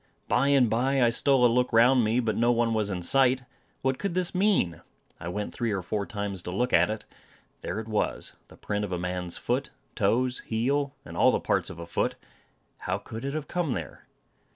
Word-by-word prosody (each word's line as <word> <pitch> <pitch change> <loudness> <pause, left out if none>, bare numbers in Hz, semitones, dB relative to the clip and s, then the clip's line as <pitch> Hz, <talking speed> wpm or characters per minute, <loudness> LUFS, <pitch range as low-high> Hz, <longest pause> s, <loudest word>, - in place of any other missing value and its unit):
Bye 135 - +2
and 140 -3 +5
bye, 130 +5 +1
I 120 -2 +5
stole 130 +2 +3
a - - +8
look 125 +1 +1
round 120 +2 +5
me, 110 +3 +2
but 110 -4 0
no 120 +1 +3
one 115 -1 +1
was 105 -2 0
in 90 -3 -3
sight, 130 +4 +3 0.4
What 130 0 0
could 195 0 -2
this 180 -1 +1
mean? 185 - +1 0.4
I 80 - -7
went 105 +4 -4
three 115 -2 -1
or 95 -3 -2
four 100 +2 -2
times 100 -5 -4
to 90 - -7
look 125 +6 -1
at - - +5
it. 110 0 -4 0.6
There 95 - -3
it 110 - -6
was 110 -1 -2
the - - -16
print 105 0 -3
of 100 - -4
a 90 - -1
man's 90 0 -3
foot; - - -1 0.2
toes, 125 +1 +1
heel, 140 +5 0
and - - -9
all - - +5
the - - +1
parts - - 0
of - - -9
a 85 - -7
foot. 85 - -1 0.6
How - - -2
could 115 +2 -8
it 140 +2 -3
have 155 -2 -4
come 175 -7 -1
there? 80 -6 -7
115 Hz, 220 wpm, -27 LUFS, 105-130 Hz, 0.6 s, a